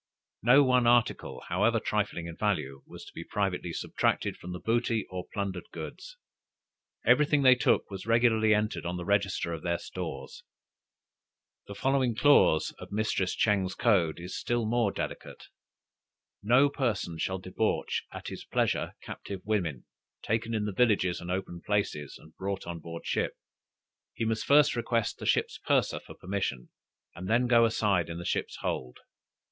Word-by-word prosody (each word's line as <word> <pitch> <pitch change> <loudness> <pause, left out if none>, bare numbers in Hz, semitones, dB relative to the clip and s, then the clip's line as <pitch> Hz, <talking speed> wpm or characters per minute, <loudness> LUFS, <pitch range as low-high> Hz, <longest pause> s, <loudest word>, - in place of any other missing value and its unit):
No 130 +5 +6
one 125 -2 +3
article, 120 -1 +2
however 105 +6 +2
trifling 105 -6 -2
in 85 -1 -7
value, 75 -11 -1
was - - -11
to - - -14
be - - -7
privately 95 -4 -2
subtracted - - -1
from 90 - -9
the 90 - -5
booty 115 0 0
or 90 -1 -5
plundered 100 -3 -4
goods. - - -8 0.9
Every 150 -1 +5
thing 145 -2 +2
they 130 -1 +8
took 125 - +1
was 95 +2 -7
regularly 115 -1 +4
entered 105 0 +1
on 90 +1 -3
the 90 - -5
register 100 -4 0
of 80 - -5
their 85 0 0
stores. - - -7 1.3
The 100 - -8
following 130 -1 +1
clause 130 - +4
of - - -10
Mistress 100 -3 0
Ching's 95 -4 +1
code 90 -10 +2
is 90 +2 -7
still 120 -1 -1
more 115 -2 +1
delicate. - - -6 0.9
No 125 +7 +5
person 110 - -2
shall 95 +4 -1
debauch 95 +4 -1
at - - -7
his - - -7
pleasure - - -1
captive 100 -2 -7
women, 90 - -1 0.4
taken 115 +1 -1
in 105 -1 -1
the 105 - -3
villages 100 -5 +2
and 85 - -7
open 90 -2 -3
places, 100 -9 -2
and 80 - -18
brought 95 0 -3
on 85 -1 -5
board 85 +1 -8
a - - -9
ship; - - 0 0.8
he 115 - -2
must 110 -1 -1
first 145 -1 +5
request 115 -2 -1
the - - -5
ship's - - +1
purser - - +1
for - - -13
permission, 90 -10 -3 0.4
and 95 - -7
then 120 +3 +3
go 120 -1 +5
aside 100 -6 +1
in 85 - -5
the 85 - -7
ship's - - -2
hold. 65 -1 -3
105 Hz, 165 wpm, -29 LUFS, 90-115 Hz, 1.3 s, they